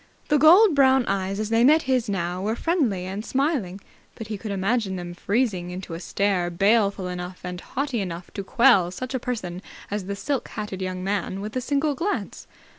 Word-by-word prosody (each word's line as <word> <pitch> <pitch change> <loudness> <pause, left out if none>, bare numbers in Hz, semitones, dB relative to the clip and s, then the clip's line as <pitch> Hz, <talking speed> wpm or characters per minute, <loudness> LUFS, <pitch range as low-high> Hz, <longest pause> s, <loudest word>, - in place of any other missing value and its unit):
The 295 - +4
gold 350 +6 +7
brown 265 -2 +4
eyes, 195 0 -1
as 215 0 -2
they 230 +1 +4
met 310 +5 +5
his 255 -4 0
now, 180 -2 -2
were 215 +3 -1
friendly 245 - 0
and 195 +3 -5
smiling, 260 - -1 0.4
but 225 -1 -8
he 215 - -3
could 220 - -6
imagine 200 +1 0
them 175 -1 -6
freezing 195 -2 -1
into 180 -1 -7
a 165 - -5
stare 185 -1 0
baleful 195 +1 +2
enough 180 0 -6
and 180 -1 -5
haughty 265 -4 -2
enough 175 -2 -6
to 200 - -5
quell 230 -5 +4
such 255 +8 -6
a 260 - 0
person 190 -8 -4 0.3
as 205 -2 -2
the 200 +1 -4
silk 270 +5 -2
hatted 210 -3 -6
young 185 0 -3
man 195 -1 -2
with 210 +3 -6
a 255 - 0
single 285 +3 0
glance. 365 +9 -3
205 Hz, 195 wpm, -24 LUFS, 185-255 Hz, 0.4 s, gold